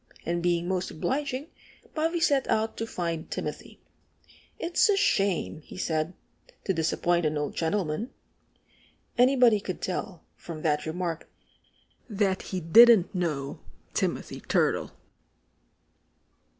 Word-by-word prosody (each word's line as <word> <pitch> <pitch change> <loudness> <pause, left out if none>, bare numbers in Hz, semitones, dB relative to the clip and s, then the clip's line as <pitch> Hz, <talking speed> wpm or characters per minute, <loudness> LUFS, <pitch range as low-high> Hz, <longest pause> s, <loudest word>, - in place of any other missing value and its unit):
And 170 0 -1
being 175 0 +1
most 185 -1 -1
obliging, 275 - -3 0.4
Bobby 325 +2 0
set 285 -4 +2
out 220 +1 +1
to 225 - -3
find 170 -5 -3
Timothy. - - -6 0.8
"It's 345 +5 +2
a 405 - +4
shame," 195 - +1
he - - -12
said, 160 -1 -1 0.5
"to 190 - 0
disappoint 170 +1 +1
an 155 -1 0
old 150 0 -2
gentleman." 175 +4 -1 1.1
Anybody 245 -3 +5
could 185 -2 -5
tell, 180 -1 -4
from 160 -2 -8
that 150 -1 +1
remark, 165 0 -3 0.8
that 195 -3 0
he 185 - -4
didn't 220 +3 +7
know 155 -7 -2 0.3
Timothy - - -2
Turtle. - - +1
185 Hz, 115 wpm, -27 LUFS, 165-235 Hz, 1.1 s, didn't